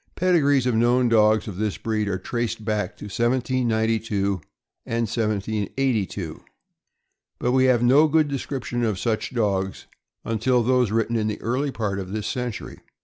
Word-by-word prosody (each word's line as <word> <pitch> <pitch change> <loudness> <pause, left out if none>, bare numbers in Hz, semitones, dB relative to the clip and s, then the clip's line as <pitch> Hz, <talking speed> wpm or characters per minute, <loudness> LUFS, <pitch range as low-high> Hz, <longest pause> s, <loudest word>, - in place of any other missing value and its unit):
Pedigrees 145 -8 +3
of 125 - +1
known 120 +2 +3
dogs 110 -1 +4
of 100 -4 -6
this 105 -1 -1
breed 110 -2 -1
are 95 -2 -1
traced 120 0 -3
back 105 -3 -2
to - - -9
1792 110 -4 0 0.4
and 115 0 -2
1782, 105 -3 -2 0.9
but 125 - 0
we 130 0 +4
have 125 -2 +3
no 140 +6 +6
good 155 0 +3
description 135 -3 -3
of 110 -4 0
such 110 -1 -1
dogs 100 -5 -1 0.4
until 120 +2 +1
those 125 -1 +2
written 115 +2 0
in 110 -1 0
the 105 - -3
early 130 +6 0
part 105 -6 -2
of 95 0 -6
this 105 -1 -3
century. 125 -1 -4
115 Hz, 150 wpm, -24 LUFS, 105-125 Hz, 0.9 s, no